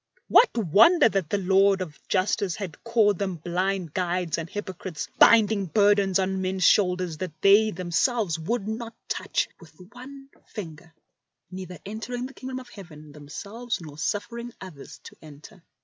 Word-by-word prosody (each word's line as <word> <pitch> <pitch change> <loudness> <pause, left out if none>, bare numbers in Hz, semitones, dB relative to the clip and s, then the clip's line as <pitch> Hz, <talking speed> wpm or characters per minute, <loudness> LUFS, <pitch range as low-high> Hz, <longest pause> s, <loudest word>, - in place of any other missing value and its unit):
What - - +5
wonder 225 - +5
that 195 -7 -2
the 205 - +1
Lord 195 +1 +3
of 170 -5 -7
justice 190 -1 0
had 190 -8 -8
called 220 -5 +2
them 190 -2 -2
blind 180 0 -2
guides 180 -2 -1
and 165 0 -6
hypo 205 -1 -5
crites, 175 -3 -6
binding 215 -3 +5
burdens 200 0 +3
on 190 0 -1
men's 185 0 -2
shoulders 180 -5 +2
that 175 -4 -6
they 205 +2 +6
themselves 180 +1 -1
would 205 +5 -2
not 225 +1 -5
touch - - -1
with 165 -2 -17 0.2
one 270 +2 -12 0.2
finger, 165 -5 -9 0.6
neither 185 -1 -8
entering 225 +4 -5
the 265 - -9
Kingdom 260 -1 -7
of 255 - -13
Heaven 155 -6 -12
themselves 200 +11 -6
nor 155 -4 -10
suffering 235 +5 -3
others 175 -8 -11
to - - -12
enter. 155 +6 -14
190 Hz, 155 wpm, -25 LUFS, 175-220 Hz, 0.6 s, they